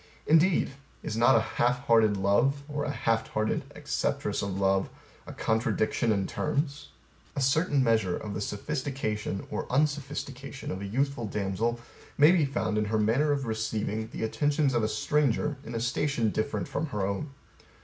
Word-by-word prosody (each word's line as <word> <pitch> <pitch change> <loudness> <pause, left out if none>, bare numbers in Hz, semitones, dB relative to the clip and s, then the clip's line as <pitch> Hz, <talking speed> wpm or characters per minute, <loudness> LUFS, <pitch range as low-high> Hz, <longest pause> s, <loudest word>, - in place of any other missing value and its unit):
Indeed, 165 +1 +4 0.3
Is - - -3
not 115 +1 +5
a 115 - +5
half 125 +2 0
hearted 110 -4 +4
love, 120 +9 +2
or 145 -1 -3
a - - -2
half 115 -5 0
hearted 110 0 0
acceptress - - -1
of 100 -1 -3
love, 95 0 +2 0.4
a - - -6
contradiction 110 0 0
in 100 -2 +1
terms? 145 - -2 0.5
A - - -1
certain 140 +1 +2
measure 110 -6 +2
of 105 -1 -6
the 105 - -3
sophisticated 110 -3 -3
or - - -4
unsophistication 140 -1 -2
of 95 - -4
a 100 - -4
youthful 135 +1 -1
damsel 105 +4 -1 0.4
may 150 +3 +7
be 175 -5 +3
found 110 -6 -1
in 105 - 0
her 110 +1 0
manner 120 +8 +2
o 145 - +2
f 135 - -5
receiving 110 -1 -2
the - - -5
attentions 145 +4 +1
of 120 - +2
a 110 - +1
stranger 145 +5 +1
in 115 -2 -7
a - - 0
station 120 -1 0
different 105 -1 -2
from 155 +3 -2
her 105 -8 -2
own. 100 +10 -3
115 Hz, 170 wpm, -28 LUFS, 105-140 Hz, 0.5 s, may